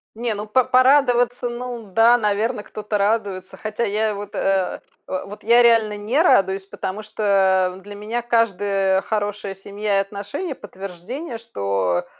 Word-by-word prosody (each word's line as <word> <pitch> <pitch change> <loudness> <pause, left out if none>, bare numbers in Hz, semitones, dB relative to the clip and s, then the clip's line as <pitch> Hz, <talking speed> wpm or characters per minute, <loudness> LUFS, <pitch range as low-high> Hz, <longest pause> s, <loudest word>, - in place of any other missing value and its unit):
Не, 230 0 -2
ну, 210 +1 -6
поп 245 +4 +1
порадоваться, 250 -2 +4
ну 240 -4 -6
да, 230 +4 +5
наверно, 210 +1 0
кто-то 210 0 -4
радуется. 200 -2 -1
Хотя 215 +2 -3
я 215 0 0
вот, 205 0 -8
э, 195 -1 0 0.3
в 185 - -4
вот 205 +2 -11
я 235 +2 +6
реально 225 -3 +4
не 225 +9 +1
радуюсь, 195 - +3
потому 195 +1 -5
что, 215 0 -6 0.5
э, 190 - -11
в - - -17
для 205 +1 -10
меня 215 +4 -3
каждая, 200 -5 +1
э, - - -6
хорошая 205 -2 -3
семья 200 +1 -2
и - - +4
отношения- 205 - -5
подтверждение, 205 - -7
что, 100 - -1
210 Hz, 160 wpm, -21 LUFS, 195-235 Hz, 0.5 s, я